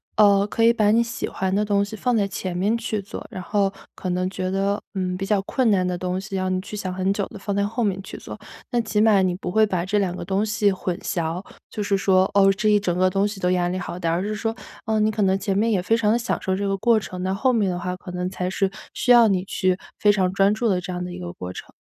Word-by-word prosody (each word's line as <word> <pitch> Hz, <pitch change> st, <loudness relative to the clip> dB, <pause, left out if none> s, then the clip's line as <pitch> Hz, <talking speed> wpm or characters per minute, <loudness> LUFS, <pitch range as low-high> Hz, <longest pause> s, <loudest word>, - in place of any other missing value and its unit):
呃， 200 Hz, -1 st, +5 dB
可 225 Hz, -, 0 dB
以 230 Hz, +1 st, +6 dB
把 215 Hz, -3 st, +2 dB
你 230 Hz, +2 st, +4 dB
喜 235 Hz, 0 st, -4 dB
欢 190 Hz, 0 st, -2 dB
的 205 Hz, +2 st, +2 dB
东 200 Hz, -1 st, +1 dB
西 205 Hz, -, -8 dB
放 240 Hz, +3 st, 0 dB
在 200 Hz, -2 st, +2 dB
前 185 Hz, -2 st, -4 dB
面 205 Hz, +5 st, +1 dB
去 230 Hz, -2 st, -2 dB
做。 200 Hz, 0 st, -7 dB
然 215 Hz, -5 st, -7 dB
后 200 Hz, 0 st, +1 dB, 0.2 s
可 185 Hz, -, -5 dB
能 180 Hz, +1 st, 0 dB
觉 185 Hz, -1 st, -3 dB
得， 195 Hz, +2 st, 0 dB
嗯， 185 Hz, -1 st, -1 dB
比 195 Hz, +1 st, -4 dB
较 210 Hz, -1 st, +2 dB
困 250 Hz, +4 st, +1 dB
难 190 Hz, -3 st, +3 dB
的 180 Hz, -, -1 dB
东 180 Hz, +1 st, -2 dB
西， 195 Hz, +1 st, -6 dB
让 185 Hz, 0 st, -1 dB
你 -, -, 0 dB
去 200 Hz, +3 st, -8 dB
想 195 Hz, -3 st, -3 dB
很 190 Hz, +1 st, 0 dB
久 200 Hz, -, -1 dB
的， 215 Hz, -, -11 dB
放 200 Hz, 0 st, -3 dB
在 200 Hz, -, +1 dB
后 225 Hz, +4 st, -1 dB
面 195 Hz, -2 st, 0 dB
去 -, -, -9 dB
做。 -, -, -9 dB, 0.3 s
那 240 Hz, -2 st, +2 dB
起 215 Hz, -2 st, -1 dB
码 210 Hz, -2 st, +5 dB
你 185 Hz, -1 st, +1 dB
不 180 Hz, -1 st, -5 dB
会 220 Hz, +3 st, +4 dB
把 185 Hz, -5 st, 0 dB
这 205 Hz, +2 st, +1 dB
2 185 Hz, -3 st, -1 dB
个 -, -, -6 dB
东 195 Hz, +2 st, 0 dB
西 215 Hz, -1 st, +2 dB
混 185 Hz, -2 st, -3 dB
淆， 170 Hz, 0 st, -2 dB, 0.3 s
就 210 Hz, -, -4 dB
是 200 Hz, 0 st, +1 dB
说， 190 Hz, -1 st, +3 dB
哦， 195 Hz, -1 st, +6 dB
这 215 Hz, +2 st, 0 dB
一 210 Hz, -1 st, +5 dB
整 180 Hz, -3 st, -1 dB
个 185 Hz, +1 st, +4 dB
东 195 Hz, +2 st, +2 dB
西 205 Hz, -1 st, -7 dB
都 180 Hz, -1 st, +1 dB
压 180 Hz, -1 st, +1 dB
力 185 Hz, -, -2 dB
好 175 Hz, -1 st, -5 dB
大， 165 Hz, -2 st, 0 dB
而 170 Hz, +3 st, 0 dB
是 210 Hz, +1 st, -2 dB
说， 225 Hz, +1 st, -2 dB, 0.3 s
呃， 220 Hz, -1 st, +1 dB
你 215 Hz, 0 st, +3 dB
可 215 Hz, -, -2 dB
能 190 Hz, -1 st, +3 dB
前 195 Hz, -1 st, -2 dB
面 220 Hz, +3 st, +2 dB
也 200 Hz, -, +2 dB
非 185 Hz, +5 st, +1 dB
常 220 Hz, -2 st, +2 dB
地 230 Hz, -, +3 dB
享 240 Hz, 0 st, -2 dB
受 190 Hz, -, 0 dB
这 200 Hz, +1 st, -2 dB
个 195 Hz, -, +1 dB
过 230 Hz, +2 st, +3 dB
程， 185 Hz, -3 st, -7 dB
那 185 Hz, +1 st, -1 dB
后 255 Hz, +5 st, +2 dB
面 210 Hz, -5 st, +2 dB
的 180 Hz, -, -2 dB
话， 180 Hz, +1 st, -3 dB
可 180 Hz, -, -11 dB
能 180 Hz, 0 st, -2 dB
才 185 Hz, -1 st, -3 dB
是 190 Hz, 0 st, 0 dB, 0.2 s
需 250 Hz, -, +2 dB
要 240 Hz, -2 st, +8 dB
你 190 Hz, -3 st, +1 dB
去 185 Hz, -1 st, 0 dB, 0.2 s
非 205 Hz, -, +5 dB
常 190 Hz, -3 st, +1 dB
专 195 Hz, +1 st, +4 dB
注 220 Hz, +3 st, 0 dB
的 185 Hz, -4 st, +1 dB
这 180 Hz, -, -6 dB
样 180 Hz, 0 st, -3 dB
的 180 Hz, -, -6 dB
一 180 Hz, -, -7 dB
个 175 Hz, -1 st, -6 dB
过 90 Hz, -, -7 dB
程。 -, -, -9 dB
195 Hz, 315 characters per minute, -23 LUFS, 185-210 Hz, 0.3 s, 要